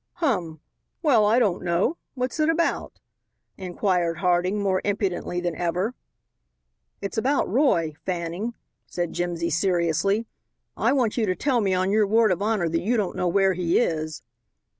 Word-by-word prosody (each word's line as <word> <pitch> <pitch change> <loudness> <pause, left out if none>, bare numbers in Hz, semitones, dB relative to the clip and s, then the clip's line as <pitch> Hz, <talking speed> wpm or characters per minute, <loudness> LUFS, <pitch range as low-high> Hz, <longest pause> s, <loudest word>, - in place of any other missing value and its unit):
"Hum, 180 - -1 0.4
well 235 -9 +4
I 220 +3 +4
don't 205 -8 +2
know. 180 - +1 0.2
What's 255 +3 -3
it 310 +1 +3
about?" 330 +1 -1 0.6
inquired 180 -2 -1
Harding 180 +2 +1
more 190 -2 +1
impudently 195 -3 -1
than 175 -2 -2
ever. 180 +7 -1 1.1
"It's 200 +2 -2
about 275 +5 +1
Roy, 185 - +2
Fanning," 180 +5 -3 0.3
said 175 -2 -3
Jimsy 170 -1 -2
seriously. 180 +4 +1 0.5
"I - - +1
want 250 -5 +1
you 225 -3 +1
to 185 - +1
tell 255 -1 +1
me 190 -2 +1
on 185 +1 +1
your 210 0 +3
word 220 0 +4
of 185 - -1
honor 210 -4 +1
that 165 0 -1
you 235 +5 +1
don't 200 -4 -1
know 180 - 0
where 195 +2 +3
he 175 -1 +1
is." 155 -7 -1
190 Hz, 160 wpm, -24 LUFS, 175-220 Hz, 1.1 s, well